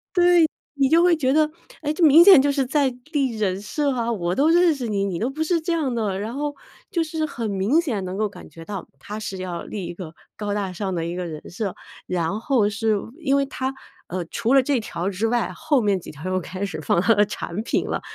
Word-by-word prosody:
对， 350 -2 +6 0.3
你 275 -2 +2
就 330 +3 +5
会 355 -1 +5
觉 265 -4 +1
得， 305 0 +3 0.3
哎， 295 0 0
这 335 +1 +1
明 315 +3 +8
显 380 -8 +9
就 285 - +2
是 275 -1 +1
在 270 -1 +1 0.2
立 265 -6 0
人 195 -2 -1
设 285 +7 -1
啊。 235 -2 -1
我 180 -5 -1
都 295 +3 +3
认 340 -1 +5
识 250 -4 -4
你， 200 -1 0
你 180 -4 -2
都 235 - 0
不 310 +3 -3
是 335 0 +1
这 340 +2 -2
样 300 -7 0
的。 210 -5 -1
然 215 +3 -4
后， 290 0 -2 0.4
就 340 -5 +1
是 315 0 -2
很 230 -6 -4
明 200 - +2
显 225 - -2
能 185 +1 -4
够 215 0 0
感 - - -12
觉 165 0 -12
到， 200 -1 -6
她 210 +9 -7
是 195 -3 -5
要 180 -2 -4
立 195 -4 -5
一 175 - -6
个 170 -2 -8 0.2
高 205 -1 -3
大 195 -3 -2
上 190 0 -3
的 165 -2 -2
一 170 +1 -3
个 180 -1 -3
人 155 -2 -7
设。 195 +1 -3 0.3
然 180 +4 -1
后 235 -6 +2
是 220 0 0 0.2
因 275 -3 +2
为 280 - +2
她， 265 0 -3 0.3
呃， 180 -1 -3
除 235 +8 0
了 270 - +6
这 265 -2 +1
条 185 -3 -4
之 205 +4 -1
外， 240 0 0
后 295 -5 +1
面 200 -3 +2
几 - - -10
条 150 +3 -11
又 185 - +1
开 185 +4 -5
始 170 -5 -4
放 170 - +2
她 225 +5 +4
的 205 0 +4
产 205 -1 -5
品 - - 0
了， - - -2
225 Hz, 270 characters per minute, -23 LUFS, 190-285 Hz, 0.4 s, 显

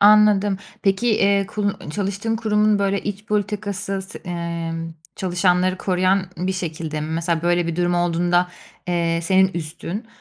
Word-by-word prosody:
Anladım. 205 -1 +6 0.3
Peki, 195 +4 +2
eee, 200 -1 +3
kunu 205 -1 -1
ı - - -5
çalıştığın 205 +4 -2
kurumun, 210 -2 +2
böyle, 200 0 0
iç 205 0 -5
politikası 205 -2 -2
se 190 - -6
emm, 165 -2 -4 0.2
çalışanları 180 0 +1
koruyan 185 +1 +2
bir 185 +2 -1
şekilde 160 -4 -4
mi? 155 - -3
Mesela 165 0 0
böyle 175 0 +2
bir 170 - -2
durum 175 0 +1
olduğunda, 175 +1 +2 0.4
eee, 170 -1 +1
senin 190 +2 +4
üstün, 170 +7 -5
185 Hz, 145 wpm, -22 LUFS, 170-200 Hz, 0.4 s, Anladım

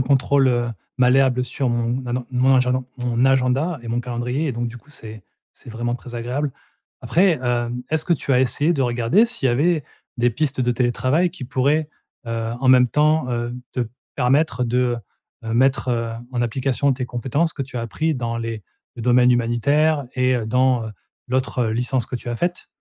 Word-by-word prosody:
contrôle, 135 +1 +3
heu, 120 -1 +1 0.3
malléable 125 0 +3
sur 130 +1 -2
mon, 120 +2 -1
ah 120 - -3
non 125 -1 -3
mon 130 +1 +3
agenda 125 0 +1
mon 125 0 0
agenda 135 +5 +2
et 115 - -8
mon 120 +1 0
calendrier 125 +5 -2
et 135 - -1
donc 120 0 -2
du 120 - -9
coup 145 +5 -23
c'est 110 -6 -10 0.3
c'est - - -13
vraiment 120 +2 -2
très 125 -1 -9
agréable. 125 +4 -2 0.5
Après, 175 -3 +3
hem, 120 0 -1
est-ce 160 0 0
que 175 - +1
tu 140 - -5
as 125 - +4
essayé 145 +5 +2
de 135 - 0
regarder 120 - +3
s'il 230 - -2
y - - +3
avait 155 +2 +1 0.3
des 120 +1 +3
pistes 140 +1 -1
de 125 - +2
télétravail 130 +8 +1
qui 175 -8 -8
pourraient, 140 +4 +1 0.4
heu, 115 0 -3
en 130 - +1
même 125 -1 +6
temps, 150 -1 +2
heu, 120 0 -2 0.2
te 125 -3 -2 0.3
permettre 130 -1 +2
de, 125 0 +1 0.5
heu, 115 0 -3
mettre, 130 0 +2
heu, 115 -1 -1 0.2
en 120 -1 0
application 135 +3 0
tes 125 -1 -3
compétences 135 +8 -1
que 140 - -3
tu 130 -1 -8
as - - -2
appris 155 +8 -1
dans 115 -3 -3
les 115 -2 -4 0.3
domaines 125 +1 +4
humanitaires 140 +6 +2
et 130 0 +2
heu, 110 -2 -3
dans, 125 0 +2
heu, - - -6 0.4
l'autre 130 -2 0
licence 120 +3 0
que 125 - -4
tu 120 - -9
as 120 - -2
faite? 175 +4 -2
125 Hz, 195 wpm, -21 LUFS, 120-135 Hz, 0.5 s, même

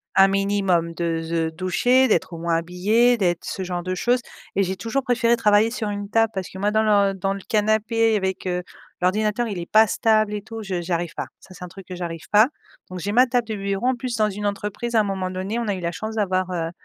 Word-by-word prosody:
un 195 0 +7
minimum 195 -4 +1
de 165 -1 -1
se 165 0 -1
doucher, 215 +10 +2
d'être 185 - +1
au 165 - -6
moins 170 0 0
habillée, 205 +9 +2
d'être 175 -4 0
ce 190 - -4
genre 180 -1 -4
de 185 +1 -2
choses 245 +6 +1 0.3
et 195 - +3
j'ai 190 0 -2
toujours 230 +8 -2
préféré 240 -2 +2
travailler 210 0 +4
sur 225 -3 -3
une 205 0 -5
table 225 0 +2
parce 190 -2 -4
que - - -10
moi 205 +1 +1
dans 215 +1 +2 0.3
l 195 - -5
dans 195 +2 0
le 200 - -6
canapé 220 +1 +2
avec, 190 -1 -3
heu, 180 0 -1 0.4
l'ordinateur 210 +5 +1
il 205 -4 -4
est 170 - -7
pas 220 0 +6
stable 215 -2 +2
et 210 - -3
tout 225 0 -8
je 195 -2 -4
je 175 - -2
j'arrive 170 -1 -2
pas, - - -4
ça 185 - -15
c'est 180 - -10
un - - -10
truc 190 +1 -13
que 185 - -6
j'arrive 165 -3 -6
pas. 215 +4 +6 0.4
Donc 185 0 -6
j'ai 205 +3 -3
ma 250 +3 +6
table 245 -1 0
de 220 - -2
bureau, 200 +4 -2
en 260 - +2
plus, 245 0 -4
dans 215 -1 +2
une 205 +1 -5
entreprise 210 +4 -3
à - - +6
un - - 0
moment 190 -2 -3
donné 190 +5 -3
on 235 - -3
a 200 - 0
eu - - -6
la 170 0 -2
chance 220 +5 -5
d'avoir, 185 -3 0
heu 165 -2 -2
200 Hz, 255 wpm, -23 LUFS, 180-220 Hz, 0.4 s, un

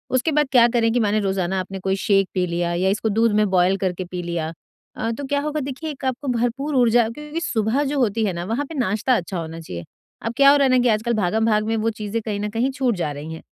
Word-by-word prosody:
उसके 255 +5 +1
बाद 295 -1 +2
क्या 240 -3 +6
करें 230 -1 +1
कि 245 - +2
माने 215 -1 +2
रोजाना 190 -2 -1
आपने 190 +1 -5
कोई 190 +1 0
शेक 195 -2 +3
पी 185 -2 +1
लिया 170 0 -1
या 185 +2 +1
इसको 215 +3 0
दूध 225 +2 +2
में - - +3
बॉइल 185 +1 +3
करके 185 -1 -2
पी 180 0 -5
लिया, 170 -2 -3 0.4
अ, 225 +1 -2
तो 280 +5 -5
क्या 285 +1 0
होगा? 300 +1 -2
देखिए 280 +3 -5
1 270 -1 -8
आपको 260 +2 -2
भरपूर 270 +5 -1
ऊर्जा 240 -2 +4
क्योंकि 300 +7 -6
सुबह 230 - 0
जो 285 0 -1
होती 225 -2 +1
है 195 - -1
ना 170 0 -4
वहाँ 230 +9 -2
पे 320 - -9
नाश्ता 220 +3 +1
अच्छा 180 -2 -3
होना 165 0 -6
चाहिए। 90 - -7 0.4
अब 230 - -2
क्या 275 0 +7
हो 290 - +5
रहा 280 - +3
है - - +1
ना 255 - +5
कि 245 - +3
आजकल 225 +2 +1
भागम-भाग 215 +1 +1
में 225 - 0
वो 220 +1 +1
चीजें 215 0 -4
कहीं 210 -2 -3
न 210 +1 -2
कहीं 235 +5 0
छूट 260 -4 0
जा 170 -5 -2
रही 150 +3 -7
हैं 160 - -8
220 Hz, 265 wpm, -22 LUFS, 190-255 Hz, 0.4 s, क्या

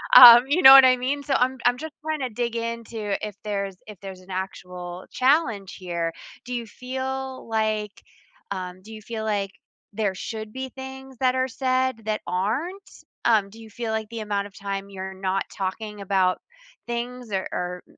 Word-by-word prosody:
Um, 240 - +12
you 320 +6 +2
know 265 - +12
what 270 -1 +11
I 255 0 +5
mean? 270 +3 -1
So 280 - -1
I'm 260 +1 +2
I'm 245 0 +4
just 315 +3 -7
trying 310 -1 -2
to 255 - -1
dig 235 +1 -2
in 230 0 -3
to 210 -2 -3
if 205 - -9
there's 200 -2 -3
if 210 -4 -11
there's 190 -2 -8
an 185 +1 -13
actual 180 -1 -6
challenge 255 - +1
here? 170 -3 -2 0.3
Do 250 - -5
you 235 -1 -3
feel 260 +2 -5
like, 215 -2 0 0.6
um 185 -1 -5
Do 220 - -12
you 215 - -9
feel 220 +1 -5
like 200 -2 -1 0.4
there 200 -2 -1
should 215 +2 -6
be 260 0 -5
things 265 0 -9
that 255 -1 +2
are 260 0 +1
said 255 -1 0
that 215 0 -1
aren't? 255 - -1 0.4
Um, 210 -4 +4
do 225 +2 -13
you 220 - -12
feel 225 +1 -4
like 220 -1 -2
the 230 -1 -5
amount 205 -1 -2
of 200 - -17
time 195 0 -4
you're 190 -1 -6
not 190 0 -1
talking 205 +2 -4
about 190 -2 +2 0.5
things 240 -1 -4
or 190 -1 -1
or, 180 0 -4
220 Hz, 190 wpm, -25 LUFS, 195-255 Hz, 0.6 s, Um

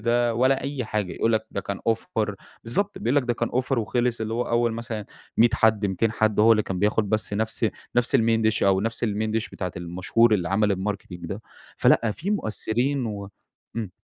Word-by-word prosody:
ده 120 +1 +2
والّا 130 +3 +3
أي 140 -3 -3
حاجة، 105 -4 -2
يقول 115 - +1
لك 110 0 0
ده 100 - -3
كان 100 0 -5
offer 110 -2 -1 0.3
بالضبط، 200 - 0
بيقول 120 +5 0
لك 145 - +4
ده 120 -1 -1
كان 120 - -1
offer 130 0 0
وخلص، 120 +1 0
اللي 110 +1 -2
هو 120 - 0
أوّل 120 -1 +1
مثلًا 115 -2 -5 0.3
100 120 +1 +6
حد، 110 -2 +3
200 105 +3 0
حد 110 -1 +1
هو 115 +2 +7
اللي 110 -1 +3
كان 95 -2 -4
بياخد 105 +1 +1
بس 110 0 -1
نفس 110 +2 0 0.3
نفس 120 +3 +3
الMain 115 -2 +2
dish 110 - -1
أو 95 -1 +4
نفس 115 +3 -2
الMain 110 0 -1
dish 115 - -4
بتاعة 90 -2 -4
المشهور 95 +6 +2
اللي 90 -3 -1
عمل 100 +1 +2
الmarketing 100 +2 -3 0.2
ده، 100 +5 -6 0.3
فلأ 115 - +4
في 180 - -4
مؤثّرين 125 - 0
و 100 -2 -5 0.5
إمم. 110 -5 -3
110 Hz, 205 wpm, -25 LUFS, 105-120 Hz, 0.5 s, هو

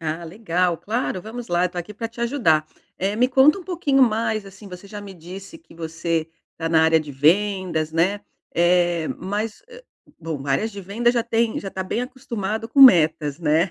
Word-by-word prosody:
Ah, 160 +1 -4
legal. 180 -1 -1
Claro, 220 -3 -2
vamos 235 +2 -8
lá, 175 +1 +1
tô 180 - -15
aqui 175 +5 -6
para 225 +2 -4
te 235 +1 -12
ajudar. 230 - +2 0.3
Eh, 195 +3 -1
me 250 +3 +3
conta 270 +6 +5
um 365 - -10
pouquinho 315 -7 +1
mais, 220 -2 +1
assim, 195 +1 -13
você 180 +1 -10
já 205 +1 -8
me 200 -1 -9
disse 190 - -10
que 320 - -20
você 165 0 -3 0.3
tá 165 -1 -3
na 160 -1 +4
área 160 0 +4
de 150 -2 -8
vendas, 170 +1 +1
né, 185 +5 +1 0.3
eh, 175 -1 +2
mas, 210 +3 -4
ah, 485 +1 -12 0.4
bom, 155 -4 -5
áreas 140 +11 0
de 200 - -7
vendas 230 +6 0
já 235 - +2
têm 230 -1 0
já 195 - -6
tá 190 - -4
bem 185 +5 -2
acostumado 225 -4 -4
com 275 - +2
metas, 160 - +6
né. 165 +2 +2
195 Hz, 195 wpm, -22 LUFS, 165-225 Hz, 0.4 s, metas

